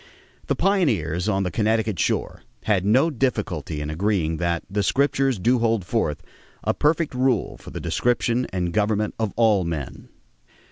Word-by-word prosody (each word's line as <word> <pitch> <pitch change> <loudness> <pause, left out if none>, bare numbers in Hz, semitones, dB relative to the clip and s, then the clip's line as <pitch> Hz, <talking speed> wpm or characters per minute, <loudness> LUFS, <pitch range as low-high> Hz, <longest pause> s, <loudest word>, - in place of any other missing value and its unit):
The - - +1
pioneers 110 - +1
on 95 -2 +1
the 90 - -2
Connecticut 110 -3 0
shore - - -1 0.2
had 100 -4 +1
no 130 +10 +4
difficulty 105 - -2
in 75 0 -4
agreeing 85 -2 0
that 85 -1 -1
"the 100 +1 -1
Scriptures 135 +1 +1
do 120 +7 +2
hold 115 -5 +1
forth 90 -8 -1 0.4
a - - +1
perfect 155 0 +1
rule 125 -3 +1
for - - -12
the - - -6
direction 120 0 0
and 90 -2 -2
government 105 +1 +1
of 110 -3 0
all 110 -5 +3
men." 80 -5 -5
105 Hz, 155 wpm, -23 LUFS, 90-125 Hz, 0.4 s, no